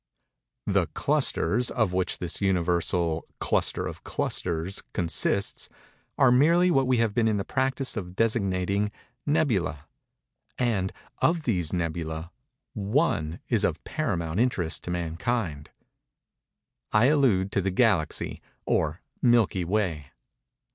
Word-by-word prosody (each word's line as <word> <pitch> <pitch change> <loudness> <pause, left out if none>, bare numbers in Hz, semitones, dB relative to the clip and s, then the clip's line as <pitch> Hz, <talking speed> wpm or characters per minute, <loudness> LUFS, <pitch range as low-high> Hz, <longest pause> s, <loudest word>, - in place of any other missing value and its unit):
The - - +2
"clusters" 120 +9 +2
of 110 -7 0
which 90 -1 0
this 90 +2 -3
Universal 85 -3 +1 0.2
"cluster - - 0
of - - -7
clusters" 85 +2 -2
consists, 85 -2 0 0.5
are 135 -3 +5
merely 170 +8 +5
what 135 -5 +3
we 130 -1 +3
have 115 -2 +1
been 115 0 +2
in 110 -2 +2
the 100 - -1
practice 130 0 0
of 90 -4 -5
designating 100 -2 +1 0.4
"nebulæ"—and, 95 - -2 0.3
of 165 -1 +2
these 90 - 0
"nebulæ," 80 -1 -3 0.4
one 100 - 0
is - - +1
of - - 0
paramount 85 +1 -2
interest 100 -10 0
to - - -5
mankind. 85 -1 -2 1.2
I 105 +3 +4
allude 125 -10 +3
to 100 - +1
the 95 - 0
Galaxy, 95 -5 +1 0.2
or 80 +2 0 0.2
Milky 115 -7 +3
Way. 85 -6 -1
95 Hz, 115 wpm, -27 LUFS, 85-120 Hz, 1.2 s, are